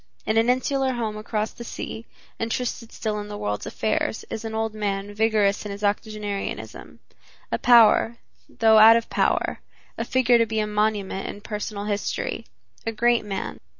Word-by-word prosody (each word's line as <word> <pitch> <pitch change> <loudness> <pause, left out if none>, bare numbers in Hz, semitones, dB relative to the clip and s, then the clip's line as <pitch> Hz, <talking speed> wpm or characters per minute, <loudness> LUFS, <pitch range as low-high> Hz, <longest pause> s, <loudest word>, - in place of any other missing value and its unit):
In 220 - 0
an 225 +2 +3
insular 265 +1 +1
home 225 -3 -3
across 215 0 -2
the 235 - -10
sea, 225 -1 -7 0.3
interested 230 0 -3
still 215 -2 -3
in 205 - -6
the 205 0 -6
world's 105 - -3
affairs, 220 0 -1
is 220 - -4
an 220 0 -5
old 220 0 -1
man 205 -1 -3
vigorous 210 -2 +2
in 210 - -6
his 200 +1 -7
octogenarianism, 205 -1 -3 0.5
a - - 0
power, 235 -1 +5 0.3
though 220 -1 +5
out 225 +1 +9
of 230 - -4
power, - - +1 0.4
a - - 0
figure 250 -2 +3
to 230 - +3
be 220 0 -1
a 215 - +1
monument 210 -2 -1
in - - -6
personal 210 -1 -5
history, 205 -1 -3 0.4
a 225 - -2
great 235 +1 +2
man. 200 -2 -5
215 Hz, 170 wpm, -24 LUFS, 210-230 Hz, 0.5 s, out